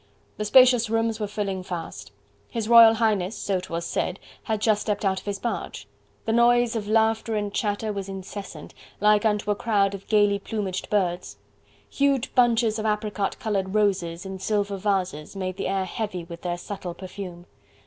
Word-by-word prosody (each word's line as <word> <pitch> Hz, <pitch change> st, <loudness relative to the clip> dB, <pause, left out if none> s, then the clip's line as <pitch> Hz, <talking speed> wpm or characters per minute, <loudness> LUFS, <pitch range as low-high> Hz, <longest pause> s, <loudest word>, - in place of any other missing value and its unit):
The 210 Hz, -, -2 dB
spacious 245 Hz, 0 st, +6 dB
rooms 225 Hz, 0 st, 0 dB
were 210 Hz, -, -2 dB
filling 200 Hz, -2 st, -3 dB
fast. 175 Hz, -, -7 dB, 0.4 s
His 225 Hz, -2 st, -3 dB
Royal 230 Hz, -1 st, +8 dB
Highness, 215 Hz, -3 st, 0 dB
so 195 Hz, -2 st, -1 dB
'twas 170 Hz, -2 st, -5 dB
said, -, -, -2 dB, 0.3 s
had 220 Hz, -2 st, -1 dB
just 215 Hz, -1 st, +2 dB
stepped 210 Hz, -1 st, -2 dB
out 190 Hz, -1 st, +1 dB
of -, -, -18 dB
his 200 Hz, -1 st, -2 dB
barge. 235 Hz, -, -4 dB, 0.4 s
The 225 Hz, -, 0 dB
noise 240 Hz, 0 st, +4 dB
of 210 Hz, -2 st, -3 dB
laughter 220 Hz, +1 st, +2 dB
and 205 Hz, -1 st, -2 dB
chatter 210 Hz, 0 st, -1 dB
was 200 Hz, -1 st, -5 dB
incessant, 195 Hz, +1 st, -8 dB, 0.3 s
like 210 Hz, +1 st, +4 dB
unto 210 Hz, -1 st, +1 dB
a -, -, +1 dB
crowd 200 Hz, -3 st, +1 dB
of 200 Hz, -1 st, -8 dB
gaily 205 Hz, -2 st, +3 dB
plumaged 195 Hz, -3 st, -4 dB
birds. 180 Hz, -4 st, -1 dB, 0.5 s
Huge 275 Hz, -2 st, 0 dB
bunches 230 Hz, -3 st, +3 dB
of 215 Hz, -, -3 dB
apricot 210 Hz, -2 st, -1 dB
coloured 195 Hz, -2 st, -2 dB
roses 190 Hz, -4 st, 0 dB
in 190 Hz, 0 st, -6 dB
silver 200 Hz, 0 st, -1 dB
vases 185 Hz, -5 st, -2 dB
made 185 Hz, -1 st, -4 dB
the -, -, -2 dB
air 190 Hz, 0 st, 0 dB
heavy 185 Hz, -2 st, -4 dB
with 170 Hz, 0 st, -10 dB
their 175 Hz, -1 st, -2 dB
subtle 180 Hz, -1 st, -6 dB
perfume. 180 Hz, -2 st, -8 dB
205 Hz, 175 wpm, -25 LUFS, 190-220 Hz, 0.5 s, Royal